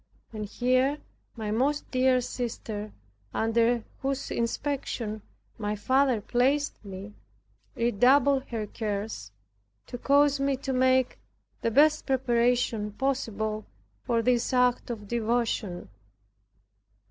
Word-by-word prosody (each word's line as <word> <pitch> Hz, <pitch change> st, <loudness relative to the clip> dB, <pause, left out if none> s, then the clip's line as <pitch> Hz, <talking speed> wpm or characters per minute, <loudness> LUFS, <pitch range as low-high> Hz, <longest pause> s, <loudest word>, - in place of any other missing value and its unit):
And 215 Hz, -1 st, -4 dB
here 255 Hz, +6 st, +1 dB, 0.4 s
my 215 Hz, -3 st, -4 dB
most 275 Hz, +7 st, 0 dB
dear 255 Hz, 0 st, +3 dB
sister, 220 Hz, -4 st, -5 dB, 0.4 s
under 230 Hz, +1 st, +2 dB, 0.2 s
whose 275 Hz, 0 st, -2 dB
inspection 235 Hz, -3 st, -2 dB, 0.4 s
my 210 Hz, -1 st, -1 dB
father 260 Hz, +1 st, +2 dB
placed 265 Hz, +7 st, 0 dB
me, 200 Hz, +1 st, -8 dB, 0.6 s
redoubled 260 Hz, +4 st, +3 dB
her 225 Hz, -3 st, -4 dB
cares, 205 Hz, -, -4 dB, 0.5 s
to 245 Hz, -, -7 dB
cause 285 Hz, +1 st, +4 dB
me 275 Hz, -1 st, +1 dB
to 270 Hz, 0 st, -3 dB
make 260 Hz, 0 st, +2 dB, 0.4 s
the -, -, +1 dB
best 300 Hz, +6 st, +4 dB
preparation 240 Hz, -4 st, +1 dB
possible 220 Hz, -4 st, -2 dB, 0.3 s
for 230 Hz, -, 0 dB
this 245 Hz, -1 st, +2 dB
act 250 Hz, -1 st, +2 dB
of 215 Hz, -4 st, -5 dB
devotion. 230 Hz, -5 st, -1 dB
240 Hz, 105 wpm, -27 LUFS, 215-265 Hz, 0.6 s, cause